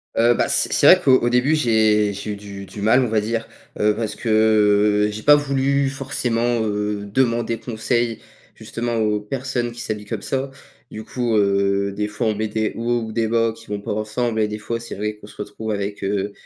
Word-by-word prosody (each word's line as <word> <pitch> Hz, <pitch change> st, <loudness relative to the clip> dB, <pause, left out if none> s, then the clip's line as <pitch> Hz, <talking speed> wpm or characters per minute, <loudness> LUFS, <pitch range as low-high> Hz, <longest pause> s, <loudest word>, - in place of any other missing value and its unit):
Heu, 120 Hz, +1 st, +4 dB
bah -, -, 0 dB
c'est -, -, +2 dB
c'est -, -, +4 dB
vrai -, -, +8 dB
qu'au 130 Hz, -2 st, +5 dB
au 120 Hz, -, 0 dB
début, 125 Hz, +6 st, +2 dB
j'ai 110 Hz, -6 st, +2 dB
j'ai 100 Hz, +2 st, -5 dB
eu -, -, -3 dB
du 100 Hz, -1 st, -9 dB
du 100 Hz, -, -9 dB
mal, 110 Hz, +5 st, +4 dB
on -, -, 0 dB
va 110 Hz, -1 st, +1 dB
dire. 115 Hz, +1 st, -3 dB, 0.3 s
Heu, 105 Hz, 0 st, +3 dB
parce 110 Hz, -1 st, -3 dB
que, 115 Hz, -, -5 dB, 0.8 s
heu, -, -, -4 dB
j'ai 110 Hz, +1 st, -7 dB
pas 145 Hz, 0 st, +7 dB
voulu 140 Hz, -1 st, +1 dB
forcément, 120 Hz, -3 st, -1 dB
heu, 105 Hz, 0 st, -2 dB
demander 115 Hz, 0 st, 0 dB
conseil, 120 Hz, 0 st, -1 dB, 0.4 s
justement, 120 Hz, 0 st, -4 dB
aux 105 Hz, -2 st, +1 dB
personnes 125 Hz, +1 st, -3 dB
qui 120 Hz, 0 st, -9 dB
s'habillent 105 Hz, -1 st, -4 dB
comme 105 Hz, -1 st, -5 dB
ça. 135 Hz, 0 st, -2 dB, 0.4 s
Du 110 Hz, -, -8 dB
coup, 120 Hz, -1 st, -2 dB
heu, 100 Hz, -1 st, +2 dB
des 105 Hz, +1 st, -2 dB
fois 105 Hz, +2 st, -2 dB
on 110 Hz, -, 0 dB
met 110 Hz, +1 st, -2 dB
des 110 Hz, 0 st, -1 dB
hauts 120 Hz, +1 st, -1 dB
ou 110 Hz, -, -6 dB
des 115 Hz, 0 st, 0 dB
bas 115 Hz, 0 st, +1 dB
qui 115 Hz, -, -16 dB
vont 105 Hz, -1 st, -4 dB
pas -, -, -5 dB
ensemble 110 Hz, +2 st, -2 dB
et 105 Hz, -, +2 dB
des 105 Hz, 0 st, -5 dB
fois, 115 Hz, +2 st, -4 dB
c'est 115 Hz, -, -8 dB
vrai 105 Hz, +1 st, -3 dB
qu'on 105 Hz, -, -14 dB
se -, -, -15 dB
retrouve 110 Hz, +1 st, -6 dB
avec, 100 Hz, 0 st, -4 dB
heu, 100 Hz, +1 st, -1 dB
110 Hz, 220 wpm, -21 LUFS, 105-120 Hz, 0.8 s, vrai